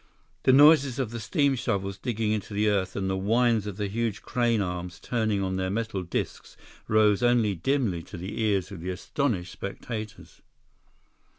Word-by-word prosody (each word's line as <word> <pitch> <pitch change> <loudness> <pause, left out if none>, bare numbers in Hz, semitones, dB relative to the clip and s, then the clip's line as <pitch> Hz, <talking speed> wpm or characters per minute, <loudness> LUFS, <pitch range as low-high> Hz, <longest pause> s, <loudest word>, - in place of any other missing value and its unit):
The - - +6
noises 140 -1 +6
of 130 -5 -2
the 120 - -5
steam 140 +4 +1
shovels 100 -6 -2
digging 110 -1 -1
into 105 -1 -3
the 105 +1 +2
earth 100 -3 0
and 95 -1 -2
the 95 - 0
whines 110 +2 +2
of 100 -2 -6
the 105 -1 -1
huge 110 0 -2
crane 120 -2 +1
arms 90 -2 -4
turning 110 -4 -1
on 95 0 -2
their 95 0 -1
metal 110 -1 -2
discs 85 - -5 0.3
rose 105 -1 +4
only 120 -4 +3
dimly 100 - 0
to 100 - -9
the 95 +6 -5
ears 105 -3 0
of 95 - -7
the 90 - -4
astonished 95 0 -2
spectators. 110 +2 -7
105 Hz, 175 wpm, -27 LUFS, 95-120 Hz, 0.3 s, The